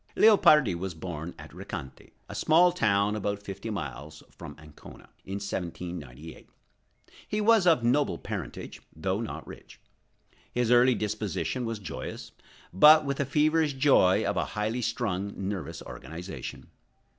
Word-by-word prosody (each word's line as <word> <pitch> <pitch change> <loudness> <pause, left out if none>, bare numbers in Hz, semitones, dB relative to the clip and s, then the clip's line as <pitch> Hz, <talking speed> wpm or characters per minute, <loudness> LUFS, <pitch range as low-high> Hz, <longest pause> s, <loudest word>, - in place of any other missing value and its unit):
Leopardi 155 - +6
was 90 +1 -5
born 80 0 -6
at - - -11
Recanati, 65 - -8 0.2
a - - -8
small 175 +3 +4
town 105 - +1
about 100 -1 -3
fifteen 100 +2 -6
miles 75 -1 -7
from - - -10
Ancona, 75 -1 -14 0.2
in 95 - -5
1798. 85 -7 -6 0.8
He 210 - -2
was 215 -3 +4
of 160 -8 +4
noble 135 +5 +2
parentage, - - -7
though 95 +6 -2
not 115 - -6
rich. - - -13 0.7
His 120 -1 0
early 125 +1 +5
disposition 105 0 -3
was 115 -1 -3
joyous, 100 - -7 0.4
but 150 - +7
with 140 -1 -2
the 140 - 0
feverish 155 +2 +2
joy 135 -9 +4
of - - -1
a - - +1
highly 110 +4 -1
strung, 100 -4 -2
nervous 95 -5 -5
organization. 90 +4 -8
105 Hz, 135 wpm, -28 LUFS, 90-135 Hz, 0.8 s, but